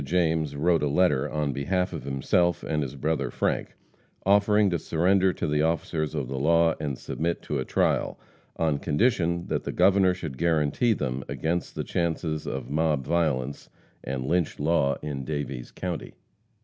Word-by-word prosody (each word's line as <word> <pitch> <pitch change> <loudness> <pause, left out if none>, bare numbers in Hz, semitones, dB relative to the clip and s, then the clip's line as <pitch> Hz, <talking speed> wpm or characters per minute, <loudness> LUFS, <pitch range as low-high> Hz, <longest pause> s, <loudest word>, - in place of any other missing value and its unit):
James 80 -1 +1
wrote 85 +3 +2
a 75 - +1
letter 75 -2 +2
on 75 -2 -1
behalf 90 +7 -1
of - - -6
himself 85 +6 +1
and 75 -1 -1
his 70 -1 -4
brother 80 +4 -1
Frank, - - -2 0.5
offering 100 0 +4
to 85 - 0
surrender 95 +5 +2
to - - -3
the 75 0 +1
officers 80 -1 -1
of 70 -4 -2
the 65 +1 -4
law 85 +3 +4
and 70 -4 -3
submit 85 +1 -3
to 75 - -2
a 65 - -2
trial, - - 0 0.4
on 80 -3 0
condition 85 - +1
that - - -1
the - - -3
Governor 95 -2 +4
should 65 -7 -7
guarantee 85 - +2
them 65 -8 -3
against 85 +2 -2
the - - -2
chances 80 -2 -2
of 65 -2 -4
mob 75 -3 +1
violence 70 -5 -1 0.3
and 65 -1 -3
lynch 85 +2 0
law 75 -2 +2
in 70 -3 -4
Daviess 70 -4 -4
county. 90 -3 -5
80 Hz, 165 wpm, -26 LUFS, 70-85 Hz, 0.5 s, offering